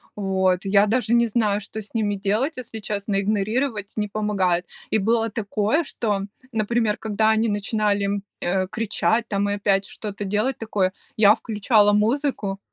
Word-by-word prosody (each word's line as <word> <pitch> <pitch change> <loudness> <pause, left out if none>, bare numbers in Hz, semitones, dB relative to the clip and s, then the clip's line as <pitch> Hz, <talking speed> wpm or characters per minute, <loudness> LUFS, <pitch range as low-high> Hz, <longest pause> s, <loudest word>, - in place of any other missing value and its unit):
Вот, 190 -2 0
я 200 +1 +4
даже 235 +2 0
не 235 0 +4
знаю, 210 -2 +1
что 215 +2 -7
с 210 - -13
ними 210 -3 0
делать, 215 +10 -1
если 230 -3 -7
честно, 200 -1 -2
игнорировать 215 +2 -1
не 210 -1 -2
помогает. 195 -4 0 0.2
И - - +3
было 225 +2 +1
такое, 215 - 0
что, 205 -7 -2 0.3
например, 225 -1 0
когда 220 0 +1
они 220 +1 +2
начинали, 205 -1 0 0.2
э, 185 +1 0
кричать 225 +2 0
там 200 0 0
и - - 0
опять 195 -1 +1
что-то 205 0 -6
делать 210 +6 0
такое, 205 -4 0 0.2
я 210 -1 +6
включала 210 -1 +2
музыку 215 -2 0
210 Hz, 155 wpm, -23 LUFS, 200-225 Hz, 0.3 s, я